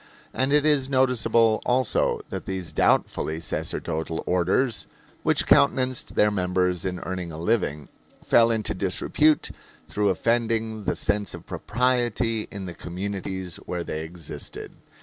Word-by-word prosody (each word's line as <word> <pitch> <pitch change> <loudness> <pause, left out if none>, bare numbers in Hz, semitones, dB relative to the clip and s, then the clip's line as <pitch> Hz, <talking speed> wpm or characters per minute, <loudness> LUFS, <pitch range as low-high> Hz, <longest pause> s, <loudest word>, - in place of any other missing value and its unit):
And 130 +1 +1
it 150 0 +4
is 145 -3 +3
noticeable 120 -4 +3
also 125 -1 +1
that - - -5
these 95 -4 -3
doubtfully 80 +1 +1
sacerdotal 80 -1 -3
orders, 95 +7 +1 0.3
which - - +2
countenanced 130 -3 +2
their 105 0 +4
members 90 -2 0
in 90 -1 -2
earning 90 -2 -4
a 80 - -7
living, 80 -6 0 0.4
fell 115 0 +5
into 110 -2 0
disrepute 100 +11 +1 0.4
through 105 -1 0
offending 110 +1 0
the - - 0
sense 105 -4 0
of - - -12
propriety 120 -3 0
in 100 -1 -6
the 90 - -6
communities 95 0 -5
where 90 -1 -5
they 80 -1 -4
existed. 80 -3 -7
100 Hz, 130 wpm, -25 LUFS, 90-120 Hz, 0.4 s, fell